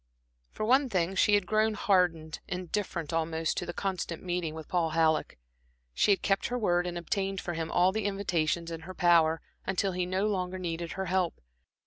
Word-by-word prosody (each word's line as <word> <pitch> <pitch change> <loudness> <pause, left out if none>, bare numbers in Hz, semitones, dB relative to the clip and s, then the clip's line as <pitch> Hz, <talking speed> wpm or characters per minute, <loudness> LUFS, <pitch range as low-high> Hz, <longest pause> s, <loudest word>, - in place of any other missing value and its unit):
For 215 - -4
one 265 +3 +4
thing, 185 -3 0
she 205 +2 +4
had 205 -2 +1
grown 215 +2 +2
hardened, 180 -7 +1
indifferent 180 -3 -3
almost 160 0 0
to - - -2
the - - -2
constant 180 -3 -3
meeting 175 -3 -2
with 160 -1 -8
Paul 170 -3 +1
Halleck. 160 -1 +2 0.6
She - - +2
had 200 - +3
kept 195 -1 +1
her 245 - -2
word 180 -6 +1
and 175 0 -4
obtained 195 +3 -2
for 175 - -4
him 165 -1 -3
all 180 +2 +4
the 215 +1 -2
invitations 170 -4 -1
in 165 - -5
her 185 - -7
power, 165 -2 +4 0.2
until 190 +1 0
he 180 0 -2
no 190 +2 0
longer 185 -3 -1
needed 170 -2 -4
her 190 - -3
help. 185 -1 0
180 Hz, 190 wpm, -29 LUFS, 165-195 Hz, 0.6 s, one